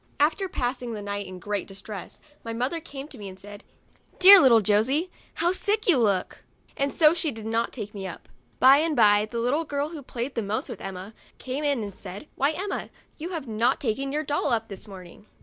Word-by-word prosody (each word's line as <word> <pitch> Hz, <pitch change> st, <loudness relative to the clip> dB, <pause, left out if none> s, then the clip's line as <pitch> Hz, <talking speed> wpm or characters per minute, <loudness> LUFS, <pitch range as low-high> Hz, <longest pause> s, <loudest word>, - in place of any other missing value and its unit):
After 325 Hz, +6 st, +2 dB
pass 250 Hz, -4 st, -2 dB
ing 240 Hz, -2 st, -5 dB
the 210 Hz, -, -5 dB
night 200 Hz, 0 st, -4 dB
in 185 Hz, 0 st, -8 dB
great 205 Hz, +2 st, -3 dB
distress, 195 Hz, 0 st, -9 dB, 0.2 s
my 230 Hz, -, -5 dB
mother 255 Hz, +8 st, -1 dB
came 285 Hz, -3 st, -9 dB
to 265 Hz, -, -12 dB
me 200 Hz, -2 st, -7 dB
and 190 Hz, 0 st, -12 dB
said, 205 Hz, +1 st, -11 dB, 0.3 s
" -, -, -33 dB
Dear 390 Hz, +2 st, +10 dB
little 245 Hz, -7 st, +6 dB
Josey, 255 Hz, -, +1 dB, 0.2 s
how 345 Hz, +1 st, +1 dB
sick 415 Hz, +3 st, -1 dB
you 330 Hz, -9 st, +5 dB
look! 200 Hz, -5 st, 0 dB, 0.2 s
" -, -, -33 dB
and 275 Hz, 0 st, 0 dB
so 310 Hz, -1 st, +5 dB
she 330 Hz, -2 st, 0 dB
did 225 Hz, -5 st, -7 dB
not 230 Hz, +1 st, 0 dB
take 210 Hz, -4 st, -7 dB
me 195 Hz, -2 st, -5 dB
up. 175 Hz, -, -10 dB, 0.3 s
By 265 Hz, +2 st, +8 dB
and 315 Hz, +1 st, +1 dB
by 205 Hz, -2 st, +5 dB
the 235 Hz, -, -5 dB
little 250 Hz, +7 st, +1 dB
girl 285 Hz, -1 st, -2 dB
who 320 Hz, -3 st, -8 dB
played 250 Hz, 0 st, -5 dB
the 230 Hz, -, -1 dB
most 210 Hz, +1 st, -3 dB
with -, -, -7 dB
Emma 195 Hz, +2 st, -7 dB, 0.2 s
came 265 Hz, +3 st, -4 dB
in 280 Hz, -6 st, +1 dB
and 200 Hz, -2 st, -7 dB
said, 200 Hz, +11 st, -9 dB
"Why, 280 Hz, -, +1 dB
Emma, 385 Hz, +4 st, -4 dB, 0.3 s
you 330 Hz, +3 st, -5 dB
have 325 Hz, -7 st, -5 dB
not 230 Hz, +3 st, +1 dB
taken 270 Hz, +3 st, -2 dB
your 300 Hz, +2 st, -1 dB
doll 290 Hz, 0 st, -1 dB
up 225 Hz, -1 st, 0 dB
this 195 Hz, +1 st, -9 dB
morning." 190 Hz, +1 st, -12 dB
245 Hz, 230 wpm, -26 LUFS, 205-295 Hz, 0.3 s, Dear